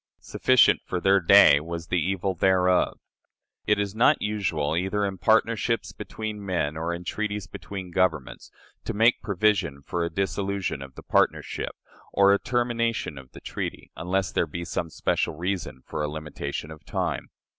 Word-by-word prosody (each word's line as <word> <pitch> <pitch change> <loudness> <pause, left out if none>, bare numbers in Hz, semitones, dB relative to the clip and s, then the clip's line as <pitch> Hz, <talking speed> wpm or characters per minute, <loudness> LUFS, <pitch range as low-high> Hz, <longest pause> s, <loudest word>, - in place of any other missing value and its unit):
Sufficient 130 -7 +4
for 90 - -3
their 95 +2 +4
day 85 -5 +7
was 85 +2 -6
the 90 -2 +1
evil 95 +2 -1
thereof. 90 0 +2 0.7
It - - +4
is 100 -1 -2
not 120 +7 +4
usual, 85 -8 -1
either 95 +4 0
in 95 -2 -4
partnerships 115 +2 +2
between 110 -2 -6
men 85 -6 -1
or 80 +2 -2
in 85 +1 -5
treaties 105 +2 -3
between 95 -3 -8
governments, 85 -7 -1 0.4
to - - -3
make 115 +3 +4
provision 95 -8 0
for 85 +5 -2
a 85 - -1
dissolution 95 -2 -2
of 70 -1 -10
the - - -11
partnership - - 0 0.4
or 100 0 +5
a 100 - +2
termination 115 - -1
of 65 -1 -16
the - - -11
treaty, - - -5
unless 90 +3 -1
there - - 0
be 85 0 -5
some 85 0 -3
special 75 - -1
reason 85 -6 -4
for 75 - -4
a 75 - 0
limitation 75 0 -5
of 80 - -12
time. - - -3
95 Hz, 165 wpm, -26 LUFS, 80-100 Hz, 0.7 s, day